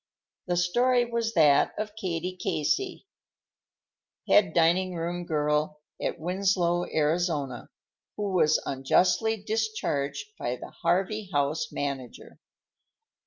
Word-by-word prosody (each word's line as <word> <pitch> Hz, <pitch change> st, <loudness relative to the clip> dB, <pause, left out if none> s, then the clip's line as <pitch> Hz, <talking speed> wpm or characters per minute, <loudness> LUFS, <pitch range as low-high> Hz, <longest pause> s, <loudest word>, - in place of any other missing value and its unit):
The 175 Hz, 0 st, 0 dB
story 240 Hz, +8 st, +3 dB
was 235 Hz, -1 st, -2 dB
that 150 Hz, -4 st, +4 dB
of 210 Hz, 0 st, -4 dB
Katie 180 Hz, -3 st, -3 dB
Casey, 195 Hz, -, -1 dB, 1.2 s
head 195 Hz, -2 st, +5 dB
diningroom 175 Hz, 0 st, +1 dB
girl 150 Hz, 0 st, 0 dB, 0.2 s
at -, -, -2 dB
Winslow, 175 Hz, 0 st, 0 dB
Arizona, 150 Hz, -4 st, -1 dB, 0.5 s
who 205 Hz, -1 st, -2 dB
was 160 Hz, -4 st, +4 dB
unjustly 180 Hz, +11 st, +2 dB
discharged 215 Hz, -, -2 dB
by -, -, -2 dB
the -, -, -10 dB
Harvey 190 Hz, +4 st, 0 dB
House 145 Hz, 0 st, 0 dB
manager. 135 Hz, -3 st, -5 dB
175 Hz, 100 wpm, -27 LUFS, 155-205 Hz, 1.2 s, head